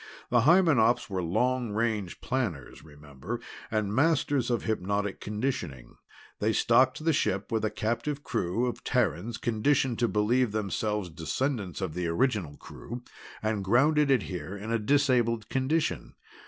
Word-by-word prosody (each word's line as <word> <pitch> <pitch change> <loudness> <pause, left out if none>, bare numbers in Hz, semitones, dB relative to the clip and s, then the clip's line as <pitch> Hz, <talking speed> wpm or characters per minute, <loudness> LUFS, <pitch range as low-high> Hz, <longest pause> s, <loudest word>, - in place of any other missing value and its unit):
"The 120 -1 +4
Hymenops 135 - +4
were 95 -1 -1
long 120 +6 0
range 110 -4 -1
planners, 110 - -3
remember, 75 - -8 0.3
and 110 -2 -1
masters 145 -1 +2
of 120 -2 0
hypnotic 100 -1 -1
conditioning. 105 - -4 0.4
They 110 +2 +1
stocked 130 +7 +3
the 165 - +3
ship 105 -4 -1
with 110 -1 0
a 110 - +1
captive 120 +7 -2
crew 90 +8 -1
of 125 - -4
Terrans 110 -2 0
conditioned 120 +2 +1
to 120 - +3
believe 110 +2 +1
themselves 105 -2 -2
descendants 100 - -3
of 95 -5 -3
the 90 0 -2
original 95 - 0
crew, 120 +2 -9 0.4
and 110 -2 -1
grounded 145 +8 +3
it 130 -7 +3
here 90 +2 -6
in 110 +3 -2
disabled 120 -6 +2
condition. 140 +5 -1
110 Hz, 140 wpm, -28 LUFS, 100-130 Hz, 0.4 s, The